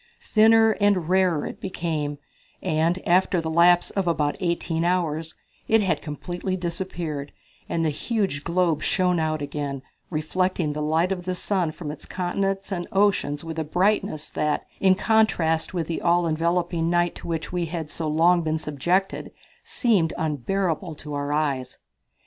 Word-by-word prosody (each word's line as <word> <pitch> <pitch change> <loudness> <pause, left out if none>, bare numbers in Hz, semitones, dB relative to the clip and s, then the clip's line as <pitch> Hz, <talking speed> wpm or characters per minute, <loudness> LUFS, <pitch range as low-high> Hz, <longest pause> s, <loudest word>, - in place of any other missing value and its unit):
Thinner 225 0 +5
and 195 -5 +2
rarer 185 -4 +2
it - - -7
became, 160 -6 -3 0.5
and, 165 +4 0
after 180 +1 +3
the 160 -1 -3
lapse 175 +2 +5
of 195 -3 -1
about 150 -3 +1
eighteen 170 -2 -1
hours, 165 -3 0 0.3
it 225 0 +4
had 190 - 0
completely 175 +5 -4
disappeared, 170 -5 -4 0.4
and 165 -1 0
the 155 - +2
huge 195 -4 -2
globe 170 -3 +1
shone 180 0 +1
out 155 -2 -1
again, 140 -2 -4 0.3
reflecting 170 0 -1
the 150 - -4
light 160 +4 +1
of 180 -2 -3
the 185 0 -1
sun 185 -3 0
from 155 -2 -6
its 150 - -10
continents 195 +2 -2
and 175 -2 -3
oceans 190 -7 +1
with 165 -1 -5
a - - 0
brightness 175 -1 0
that, 150 -1 -1
in 190 -1 +5
contrast 185 -7 +2
with 170 -3 -2
the 165 +1 -3
all 175 0 +3
enveloping 170 +1 0
night 175 0 +2
to - - -10
which 165 0 -3
we 175 -2 -1
had 160 -2 -5
so 160 - -3
long 170 +3 +4
been 160 -1 0
subjected, 170 +6 -1 0.3
seemed 200 -10 +1
unbearable 160 +3 -1
to 150 0 -8
our 145 0 -2
eyes. 145 -4 -1
170 Hz, 160 wpm, -24 LUFS, 155-185 Hz, 0.5 s, Thinner